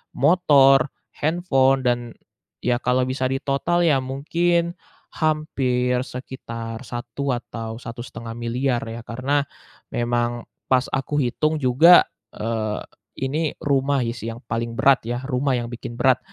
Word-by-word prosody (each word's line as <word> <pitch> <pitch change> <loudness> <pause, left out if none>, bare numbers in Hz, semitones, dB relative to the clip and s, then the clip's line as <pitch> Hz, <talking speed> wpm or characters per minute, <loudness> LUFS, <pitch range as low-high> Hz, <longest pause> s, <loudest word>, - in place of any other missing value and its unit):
motor, 140 -3 +5 0.3
handphone, 140 -5 +2
dan 120 -1 0 0.5
ya 120 -1 +1
kalau 125 +1 +1
bisa 130 0 -1
ditotal 140 +6 0
ya 145 -5 +4
mungkin 170 +6 0 0.4
hampir 130 -5 0
sekitar 115 -3 -7
1 120 +3 -4
atau 115 -2 -6
Rp1.500.000.000 120 +1 -3
ya. 115 +1 -6
Karena 135 +4 0 0.5
memang 120 0 -1 0.3
pas 130 -1 +3
aku 135 +2 -1
hitung 155 +6 0
juga, 140 +8 +7 0.3
eee, 110 -1 -2 0.4
ini 150 +3 -1
rumah 140 -1 +2
sih 115 -1 -4
yang - - -14
paling 115 0 -3
berat 135 -2 +4
ya, 120 +2 -3
rumah 130 0 0
yang 120 -1 -3
bikin 120 0 -7
berat. 130 +1 +3
130 Hz, 120 wpm, -23 LUFS, 120-140 Hz, 0.5 s, juga